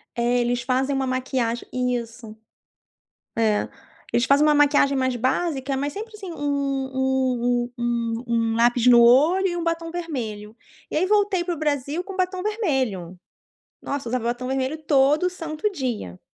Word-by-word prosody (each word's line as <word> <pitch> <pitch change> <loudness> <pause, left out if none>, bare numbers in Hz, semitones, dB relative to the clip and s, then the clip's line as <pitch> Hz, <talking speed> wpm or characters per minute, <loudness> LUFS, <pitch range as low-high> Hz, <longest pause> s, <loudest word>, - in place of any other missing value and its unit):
É, 240 +1 +1
eles 245 0 0
fazem 265 +2 0
uma 265 -1 -1
maquiagem 255 -2 -2 0.3
isso. 230 -2 -7 1.0
É, 215 -2 +1 0.4
eles 240 - +2
fazem 285 +2 +4
uma 300 - +4
maquiagem 285 -1 +4
mais 260 -1 0
básica, 270 +1 -1
mas 285 +1 -2
sempre 440 +2 -7
assim 385 -4 -8
um 280 -3 -2
um 250 -2 0
um 235 0 -2
um 235 - -1 0.2
um - - -2
lápis 240 +1 +3
no 240 -1 +8
olho 305 +11 +5
e 350 - -3
um 340 - -3
batom 330 0 -2
vermelho. 230 -11 -5 0.3
E - - -3
aí, 365 +4 +2
voltei 405 -3 +2
para 350 -1 -2
o - - -10
Brasil 295 +2 -1
com 390 -1 -8
batom 370 0 -1
vermelho. 260 - -2 0.6
Nossa, 280 -4 -4
usava 245 -1 -2
batom 245 +2 -2
vermelho 265 +3 -1
todo 295 +3 +3
santo 330 +3 -3
dia. 240 - -4
265 Hz, 160 wpm, -23 LUFS, 240-315 Hz, 1.0 s, no